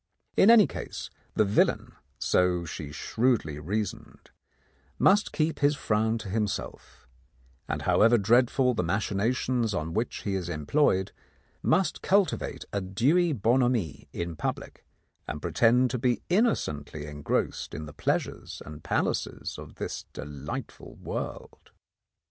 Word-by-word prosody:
In 195 - +6
any 230 -3 +8
case, - - -6 0.2
the 110 - +4
villain, 100 +2 +2 0.3
so 90 +4 +2
she 75 -2 -6
shrewdly 110 - 0
reasoned, 100 +6 -4 0.7
must 205 +2 +4
keep 155 +1 0
his 145 +1 +3
frown 110 -2 +1
to 110 -2 -7
himself, 105 - -4 0.6
and - - -3
however 115 +2 +5
dreadful 125 +4 +3
the - - 0
machinations 110 +5 0
on 80 +1 -3
which 115 +3 -2
he 100 - -2
is 90 -3 -2
employed, 95 - +1 0.5
must 190 0 +1
cultivate 195 -4 +1
a 100 - 0
dewy 140 - +2
bonhomie 120 - +1
in 85 -1 -4
public, 75 - -4 0.4
and 75 - -4
pretend 120 +10 +3
to 125 - -2
be 125 0 +1
innocently 75 - 0
engrossed 75 -1 -2
in 80 - -5
the 75 - -10
pleasures - - -2
and 75 0 -10
palaces - - -2
of - - -11
this - - -5
delightful 75 -1 -7
world. - - -6
110 Hz, 125 wpm, -28 LUFS, 85-125 Hz, 0.7 s, any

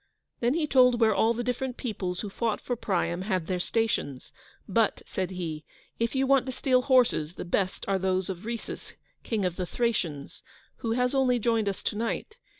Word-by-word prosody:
Then 245 +4 +2
he 325 -2 +1
told 250 -4 +5
where 220 -2 +5
all 225 +3 +3
the 240 - -2
different 250 +1 -2
peoples 185 -7 -3
who 210 - -4
fought 225 0 -1
for 245 - -3
Priam 185 -6 -1
had 185 -4 -1
their 180 0 -1
stations; 175 - -1 0.4
but, - - +1
said 185 -2 -2
he, 165 -5 -4 0.4
"if 230 +3 0
you 265 0 +2
want 270 -1 +3
to - - -1
steal 255 0 +2
horses, 245 - +3
the - - -6
best 185 +1 -1
are 195 -1 +1
those 185 0 0
of 185 0 -5
Rhesus, 230 0 -6 0.3
King 215 -4 -1
of 180 -1 -2
the 180 -2 -2
Thracians, 170 -11 -2 0.4
who 225 -1 -1
has 250 +2 +1
only 260 -2 +3
joined 225 -2 +1
us 195 - -5
to - - -1
night. 230 - -3
225 Hz, 195 wpm, -28 LUFS, 185-245 Hz, 0.4 s, told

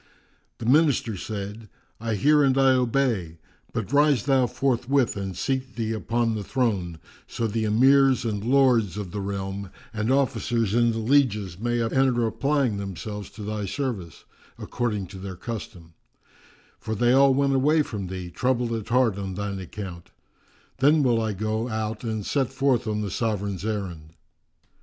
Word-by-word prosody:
The - - -7
Minister 135 -4 +3
said, 105 +2 -6 0.3
"I 115 -1 -2
hear 150 +9 +4
and 135 -1 +3
I 135 -1 +5
obey; 120 -9 0 0.3
but 115 +3 -4
rise 145 -5 +4
thou 135 -3 +3
forthwith 130 0 +1
and 95 -3 -5
seat 130 0 -2
thee 115 -2 -2
upon 115 +1 0
the 105 -2 -3
throne, 100 -9 -1 0.3
so 115 - -3
the 110 0 -1
Emirs 130 +4 +4
and 105 -3 -2
Lords 120 -6 +3
of 100 -4 -5
the 105 - -4
realm 100 0 -4 0.2
and 110 +2 -1
officers 120 -5 +1
and 120 0 +3
the 115 - -3
lieges 110 -7 +1
may 120 +1 0
enter 120 0 +2
applying 120 +1 0
themselves 100 +1 -6
to 105 - -10
thy 105 -1 -3
service, 100 - -4 0.3
according 110 -5 -2
to 95 +1 -10
their 95 -1 -6
custom; 90 -6 -7 0.9
for 110 0 -4
they 120 +3 +3
all 135 0 +5
went 140 0 +2
away 150 +4 +3
from 100 -8 -5
thee, 90 -1 -6
troubled 125 +1 0
at 110 -1 -4
heart 120 -5 +2
on 95 -2 -4
thine 100 0 -3
account. 90 -2 -8 0.7
Then 145 +3 +4
will 120 -3 +2
I 110 -1 -1
go 110 +4 -2
out 110 0 -3
and 110 -3 -3
set 135 -4 0
forth 135 -3 +1
on 105 0 -1
the 100 -3 -3
Sovran's 100 -5 -2
errand." 90 -8 -4
115 Hz, 160 wpm, -25 LUFS, 100-130 Hz, 0.9 s, I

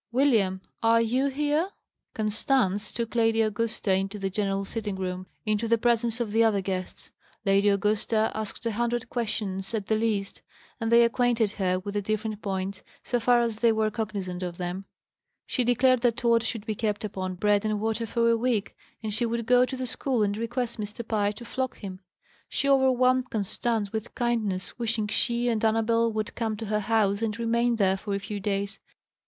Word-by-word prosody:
William, 225 -8 +2 0.2
are 230 0 +5
you 250 +4 +2
here?" 295 +5 0 0.5
Constance 215 -1 +1
took 235 -1 -3
Lady 225 -1 +3
Augusta 215 -2 0
into 195 +2 -1
the 195 -1 -2
general 195 0 -1
sitting 210 -1 -4
room, 185 -1 -4 0.2
into 215 +1 0
the 230 +1 +4
presence 235 0 +1
of 230 -3 -2
the 225 +2 +4
other 215 -3 +3
guests. 185 -1 -5 0.3
Lady 200 +1 +4
Augusta 215 +2 +1
asked 220 +2 -5
a 230 - +1
hundred 240 +2 -1
questions, 205 -4 -2
at 210 -3 -2
the 220 - +1
least; 215 -3 -1 0.4
and 225 -1 -1
they 235 0 +7
acquainted 235 -2 +2
her 185 -3 0
with 200 +2 -5
the 205 - 0
different 215 +1 -2
points, 190 -1 -3 0.2
so 245 - 0
far 240 +1 +4
as 230 -2 -2
they 235 -1 +4
were 220 -1 +1
cognizant 200 -5 -4
of 175 -1 -4
them. 180 +2 -4 0.6
She 255 - 0
declared 250 +1 +3
that 240 -1 +2
Tod 235 -2 +3
should 225 -2 -3
be 220 - -1
kept 210 -1 -2
upon 185 -3 -3
bread 205 +2 +2
and 215 -1 0
water 225 +1 -1
for 230 +2 +1
a 230 - +5
week, 230 -3 -1 0.3
and 215 -1 -2
she 235 +3 +1
would 230 0 -2
go 250 +1 +5
to 260 - -5
the 255 - -3
school 250 -1 0
and 205 0 0
request 235 +1 -3
Mr. 215 +2 -5
Pye 205 -2 +1
to 235 +3 -10
flog 260 +1 -3
him. 190 -3 -7 0.5
She 280 - -1
overwhelmed 255 -2 +3
Constance 215 0 -1
with 220 0 -4
kindness, 225 -5 -1
wishing 225 -2 0
she 235 +3 +1
and 230 -2 0
Annabel 225 +1 +2
would 215 +1 -3
come 220 -2 -2
to 225 - -5
her 210 0 0
house 210 -1 +1
and 225 -1 -1
remain 235 +1 +1
there 195 -3 +2
for 200 +1 -3
a - - -1
few 205 +1 -5
days. 200 0 -2
220 Hz, 195 wpm, -27 LUFS, 205-235 Hz, 0.6 s, they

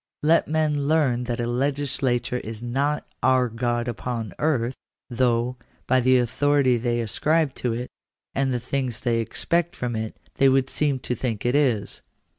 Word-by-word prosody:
Let 165 +2 +4
men 150 -2 0
learn 140 -6 +2
that 120 -1 -3
a 120 - 0
legislature 130 -1 0
is 110 0 -8
not 140 +5 -1
" - - -48
our 130 -1 +3
God 120 +1 -1
upon 115 -4 -4
earth," 130 -6 +1 0.4
though, 120 0 +1 0.3
by 130 0 +3
the 130 +1 +4
authority 130 +2 +2
they 120 0 0
ascribe 150 +6 +1
to 120 -2 0
it, 120 +2 -5 0.4
and 135 -1 0
the 125 - 0
things 130 -1 -3
they 120 -2 +1
expect 170 +8 -1
from 120 -2 -3
it, 110 0 -4 0.2
they 135 - +5
would 135 0 +2
seem 145 -3 +1
to 125 - -2
think 120 -4 -3
it 120 - +2
is. 125 -9 +1
125 Hz, 170 wpm, -24 LUFS, 120-140 Hz, 0.4 s, they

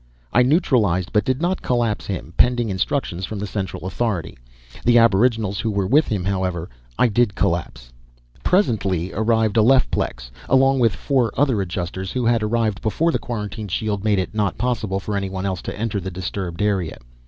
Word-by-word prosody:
I 120 - +5
neutralized 120 - +2
but 105 - +3
did 130 +5 -1
not 185 +2 0
collapse 120 -4 0
him, 95 -3 -5
pending 120 -2 +3
instructions 95 -1 -2
from 105 +3 -4
the 100 - -3
Central 95 -2 -4
Authority. 95 -4 -2 0.5
The 120 0 +5
aboriginals 110 -2 +3
who 115 - -1
were 100 -2 0
with 145 +11 +3
him, 100 -4 -1
however, 95 -3 -2 0.3
I 125 - +4
did 115 -2 +1
collapse. - - -2 0.5
Presently 100 - +1
arrived 110 0 +1
Alephplex, 110 - +2 0.2
along 135 0 +4
with 115 -5 +3
four 125 -2 +1
other 130 -6 +2
Adjusters 95 +1 -4
who 125 -2 -1
had 115 -1 +3
arrived 110 -2 0
before 160 +10 +1
the - - -1
quarantine 105 -2 -5
shield 100 +1 -2
made 105 -2 +2
it 95 +2 -2
not 105 -3 -1
possible 110 -6 -1
for 105 +2 -4
anyone 95 -1 -3
else 95 -2 -2
to - - -6
enter 110 -2 -1
the 95 0 -5
disturbed 95 0 -4
area. 95 -6 0
105 Hz, 175 wpm, -21 LUFS, 95-120 Hz, 0.5 s, I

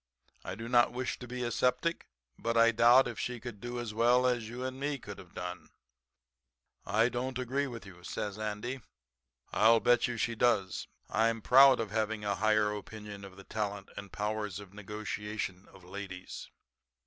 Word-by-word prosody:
'I 95 - -5
do 115 +3 -6
not 120 0 +4
wish 125 0 -3
to 125 - -8
be 125 +1 -4
a 120 - -1
septic, 125 +8 0 0.3
but 115 - -1
I 115 0 +7
doubt 120 +3 +6
if 120 -3 -6
she 125 -1 -3
can 115 -3 -8
do 120 +2 -5
as 115 -3 -4
well 120 +3 +4
as 120 -3 +1
you 125 +2 -5
and 130 0 -4
me 145 +1 -1
could 100 -6 -9
have 90 -3 -14
done.' 90 0 -6 1.2
"'I 110 +4 +3
don't 125 +1 -3
agree 130 +3 -1
with 115 -4 -8
you,' 90 -2 -13
says 105 +2 -4
Andy. 110 +5 -3 0.7
'I'll 115 +1 +6
bet 120 +3 +4
you 120 -1 -3
she 115 - 0
does. 110 -5 +1 0.2
I'm 115 0 +2
proud 135 +1 +8
of 110 -3 -2
having 110 -1 -1
a 100 - +1
higher 105 0 +2
opinion 105 -1 -8
of 95 -1 -11
the 95 - -11
talent 100 -1 -4
and 100 - -7
the - - -15
powers 105 -2 -2
of 100 -2 -12
negotiation 105 -2 -5
of 95 - -16
ladies.' 95 0 -7
110 Hz, 185 wpm, -31 LUFS, 105-120 Hz, 1.2 s, proud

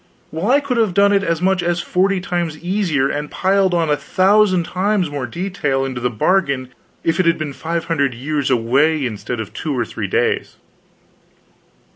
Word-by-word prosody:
"Well, 165 +8 -2
I 280 +3 +4
could 270 -4 -2
have 215 -6 +1
done 200 0 +4
it 200 - +3
as 165 -1 -1
much 190 -1 +2
as 175 0 0
forty 190 +3 +1
times 175 -4 -3
easier, 175 -6 0
and 150 +1 -3
piled 190 -1 +1
on 165 -2 +1
a - - +4
thousand 185 +4 +3
times 185 -1 0
more 140 -3 -3
detail 140 -3 -2
into 130 -2 -5
the 125 - +1
bargain, 140 - 0 0.3
if 165 +1 0
it 185 - +3
had 165 - +3
been 150 -3 -4
five 165 +3 -3
hundred 140 -7 0
years 140 +3 -2
away 135 +5 +2
instead 120 +1 -4
of 110 -2 -6
two 150 -4 -3
or 120 - 0
three - - -5
days." - - 0
165 Hz, 185 wpm, -19 LUFS, 140-190 Hz, 0.3 s, I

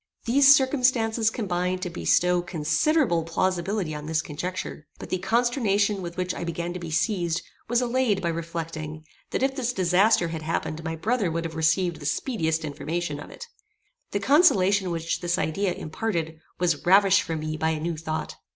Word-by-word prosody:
These 275 +4 +7
circumstances 250 -5 +2
combined 185 -4 -2
to 180 - -3
bestow 180 +1 +2
considerable 170 - +1
plausibility 180 +1 -1
on 150 0 -6
this 155 -1 0
conjecture; 160 -1 -5
but - - -10
the 185 - 0
consternation 210 -1 +1
with 170 -1 -7
which 180 0 -1
I - - -5
began 170 +1 -3
to 180 - -5
be 170 -1 -6
seized 170 0 0 0.2
was 240 +1 +2
allayed 245 -4 +1
by 170 -3 -1
reflecting, 165 -2 -5 0.2
that - - -1
if 270 0 +1
this 250 -3 -1
disaster 185 -1 +3
had 160 -1 -5
happened 160 0 -3
my 165 -1 -3
brother 210 +3 0
would 165 +1 -2
have 165 - -5
received 160 +2 +1
the 145 - -4
speediest 160 - -1
information 150 +1 -3
of 145 - -9
it. 480 - -9 0.6
The 200 - -1
consolation 200 - +4
which 165 -1 -2
this 175 0 0
idea 185 +4 0
imparted 165 -2 -3 0.2
was 170 -4 0
ravished 195 +2 +5
from 160 -3 -4
me 155 0 -3
by 160 +1 0
a 160 -1 -1
new 165 +1 -2
thought. 155 0 -4
175 Hz, 175 wpm, -25 LUFS, 160-210 Hz, 0.6 s, These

